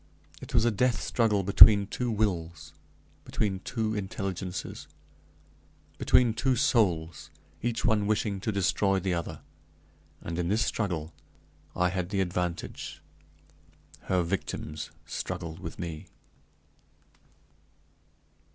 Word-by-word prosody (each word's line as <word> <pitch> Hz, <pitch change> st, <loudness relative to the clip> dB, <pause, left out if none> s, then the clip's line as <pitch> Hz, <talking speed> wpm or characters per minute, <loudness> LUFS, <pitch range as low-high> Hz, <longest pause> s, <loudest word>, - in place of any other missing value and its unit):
It -, -, -7 dB
was 115 Hz, -1 st, +4 dB
a 120 Hz, -, +3 dB
death 120 Hz, +1 st, +1 dB
struggle 105 Hz, -4 st, +1 dB
between 100 Hz, +1 st, +8 dB
two 120 Hz, +4 st, -3 dB
wills; 85 Hz, -8 st, -2 dB, 0.5 s
between 100 Hz, -3 st, -2 dB
two 110 Hz, +1 st, -2 dB
intelligences; 95 Hz, -3 st, -4 dB, 1.1 s
between 120 Hz, -3 st, +4 dB
two 130 Hz, +3 st, +1 dB
souls 95 Hz, -, +1 dB, 0.3 s
each 115 Hz, 0 st, -1 dB
one 105 Hz, -3 st, +2 dB
wishing 105 Hz, -2 st, 0 dB
to 110 Hz, -, -2 dB
destroy 95 Hz, 0 st, +1 dB
the 95 Hz, 0 st, -1 dB
other; 85 Hz, -1 st, -4 dB, 0.8 s
and, 85 Hz, +1 st, -5 dB
in 85 Hz, -, 0 dB
this 110 Hz, +4 st, +2 dB
struggle, 85 Hz, -7 st, -2 dB, 0.6 s
I 90 Hz, 0 st, +2 dB
had 90 Hz, -1 st, -3 dB
the 100 Hz, -1 st, -1 dB
advantage 90 Hz, -1 st, -3 dB, 1.1 s
her 90 Hz, -2 st, +1 dB
victims 85 Hz, -3 st, -4 dB, 0.2 s
struggled 80 Hz, -1 st, -5 dB
with 85 Hz, -3 st, -7 dB
me. 80 Hz, -3 st, -6 dB
95 Hz, 110 wpm, -28 LUFS, 85-110 Hz, 1.1 s, between